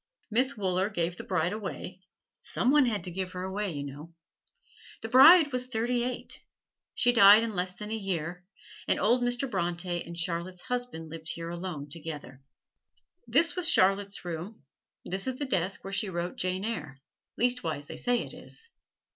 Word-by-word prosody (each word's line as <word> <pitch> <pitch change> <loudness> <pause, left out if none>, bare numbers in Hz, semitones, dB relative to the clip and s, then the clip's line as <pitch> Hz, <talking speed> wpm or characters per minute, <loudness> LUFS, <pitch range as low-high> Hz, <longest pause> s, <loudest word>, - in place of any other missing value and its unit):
Miss 255 +3 +2
Wooler 190 0 0
gave 175 -4 -2
the - - -7
bride 185 0 0
away 190 -3 -6 0.4
some 250 - 0
one 290 -3 +5
had 215 -4 -1
to 180 - -2
give 185 +1 -4
her 180 0 -4
away, 195 +1 -2
you 145 -3 -4
know. 145 +4 -9 0.9
The 225 - -4
bride 290 +5 +8
was 250 0 -1
thirty 240 0 0
eight. 250 0 -5 0.5
She 245 0 +3
died 210 -1 +8
in 230 -2 -3
less 180 0 -2
them 210 0 -7
a - - -1
year, 180 -4 -3 0.4
and - - +2
old 240 +4 +3
Mr. 245 +2 0
Bronte 175 -4 -2
and 170 0 -9
Charlotte's 170 +2 -3
husband 245 -11 -4
lived 160 0 -6
here 165 0 -4
alone 170 -4 -5
together. 150 -4 -8 0.9
This 335 0 +3
was 360 -2 +2
Charlotte's 195 0 +2
room; 175 +3 -6 0.4
this 190 +5 -3
is 260 - -1
the 285 - -2
desk 190 -6 -1
where 195 - -6
she 200 +1 0
wrote 175 0 -3
"Jane 185 +2 -2
Eyre" 155 -12 -4 0.4
leastwise 200 - 0
they - - -8
say 245 -1 +1
it - - -10
is. 460 +1 -12
190 Hz, 175 wpm, -29 LUFS, 170-240 Hz, 0.9 s, bride